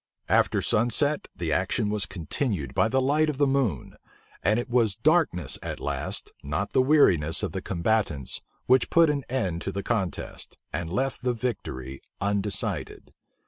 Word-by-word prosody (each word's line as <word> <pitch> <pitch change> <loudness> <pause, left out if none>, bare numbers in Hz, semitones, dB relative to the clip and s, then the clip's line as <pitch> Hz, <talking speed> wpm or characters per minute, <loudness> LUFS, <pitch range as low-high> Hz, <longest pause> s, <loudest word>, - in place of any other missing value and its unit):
After - - +3
sunset, 130 +7 +1
the 85 -3 -2
action 95 +7 +1
was 105 -3 -1
continued 85 - -3
by - - +3
the 130 +4 +1
light 150 +4 +2
of 150 - -3
the 145 - +4
moon; 135 - -1 0.4
and 105 +6 +2
it 120 - -4
was 120 -5 +2
darkness 130 - +2
at - - -5
last, - - -3
not 80 +8 -3
the 130 - +5
weariness 90 - +4
of - - -1
the 95 - -4
combatants, 85 -7 -1 0.2
which 130 0 +4
put 165 -2 +5
an 140 -2 -2
end 95 -10 -1
to 95 - -3
the 100 0 -4
contest, 95 -9 -3 0.2
and 85 -1 -3
left 135 +7 -1
the 125 -1 +1
victory 70 - -4 0.2
undecided. 100 0 -2
105 Hz, 160 wpm, -26 LUFS, 85-130 Hz, 0.4 s, the